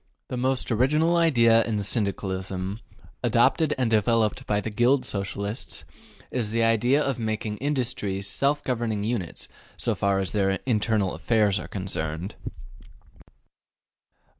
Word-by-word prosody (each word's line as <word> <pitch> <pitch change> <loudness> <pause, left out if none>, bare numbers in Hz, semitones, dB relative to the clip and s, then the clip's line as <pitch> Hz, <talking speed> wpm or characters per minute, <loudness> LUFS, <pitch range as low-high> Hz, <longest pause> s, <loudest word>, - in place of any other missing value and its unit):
The - - -3
most 130 +1 0
original 150 +9 +3
idea 120 -9 +5
in 105 -3 -2
Syndicalism 95 -2 -3 0.4
adopted 125 +6 +3
and 130 -2 +1
developed 110 0 +2
by 105 -1 +1
the 110 - -4
Guild 125 +5 +3
Socialists 100 +2 -3 0.5
is 120 -4 -1
the 115 +1 +1
idea 120 +6 +3
of 135 -3 -2
making 110 -1 -2
industries 125 -8 -2
self 140 +8 0
governing 115 -5 -1
units 105 -6 -3 0.3
so - - 0
far 100 0 +1
as 95 - -1
their 95 -2 +1
internal 110 -5 +1
affairs 105 -4 +2
are - - -7
concerned. 90 -1 -3
110 Hz, 125 wpm, -25 LUFS, 100-125 Hz, 0.5 s, idea